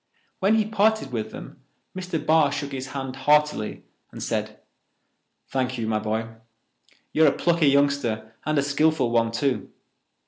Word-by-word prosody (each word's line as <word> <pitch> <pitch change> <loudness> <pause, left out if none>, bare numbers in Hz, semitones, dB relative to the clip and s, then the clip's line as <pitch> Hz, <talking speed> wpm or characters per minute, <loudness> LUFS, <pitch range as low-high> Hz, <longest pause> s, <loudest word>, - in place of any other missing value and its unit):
When 200 +3 +3
he 220 -1 +2
parted 215 -7 +1
with 110 -3 -3
them, - - -10 0.3
Mr. 185 -2 -3
Barr 155 -2 +4
shook 140 0 -4
his 135 -1 -5
hand 135 -1 -5
heartily 150 -4 +1 0.3
and - - -7
said: - - -3 0.9
"Thank 130 -1 -2
you, 115 - -2
my 110 -1 0
boy. 110 +1 -2 0.9
You're 155 0 +5
a - - +5
plucky 170 -1 +2
youngster 140 -6 +1
and 155 0 0
a 140 - +3
skilful 145 -2 +2
one, 115 -1 +2
too. 130 +3 -1
140 Hz, 150 wpm, -24 LUFS, 120-155 Hz, 0.9 s, You're